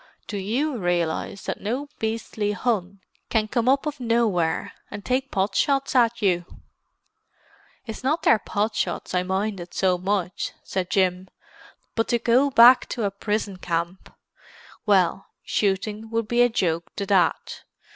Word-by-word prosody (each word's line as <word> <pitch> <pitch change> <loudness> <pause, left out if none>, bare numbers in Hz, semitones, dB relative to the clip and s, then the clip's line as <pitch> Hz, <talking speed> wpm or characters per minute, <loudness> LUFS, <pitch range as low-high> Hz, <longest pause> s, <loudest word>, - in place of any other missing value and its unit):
"Do 205 - -5
you 245 +9 -1
realize 175 +1 -1
that - - -4
no 250 +8 -2
beastly 220 -2 -2
Hun 200 -4 -2 0.3
can 220 -2 +1
come 235 +2 +1
up 275 +3 +3
out 300 - -1
of 290 - -24
nowhere 225 -9 0 0.2
and 205 -1 -8
take 260 +1 0
pot 195 0 0
shots 275 +5 +1
at 235 -2 +3
you?" 175 -3 +1 1.4
"It's 225 0 -7
not 310 +5 0
their 220 - +5
pot 210 +2 -1
shots 175 -2 -3
I 180 - +2
minded 190 -1 -3
so 185 -2 +2
much," 185 -1 -2
said 185 -2 -3
Jim. 185 -1 +1 0.7
"But 225 - 0
to 240 - +2
go 245 +4 +3
back 245 0 +7
to 235 - -3
a 200 - 0
prison 205 -1 -2
camp—well, 180 +2 -3 0.2
shooting 210 +2 -1
would 230 -1 -1
be 240 +2 +2
a 245 - +5
joke 170 -7 -1
to 200 - -3
that. 185 -4 +1
210 Hz, 150 wpm, -24 LUFS, 185-235 Hz, 1.4 s, back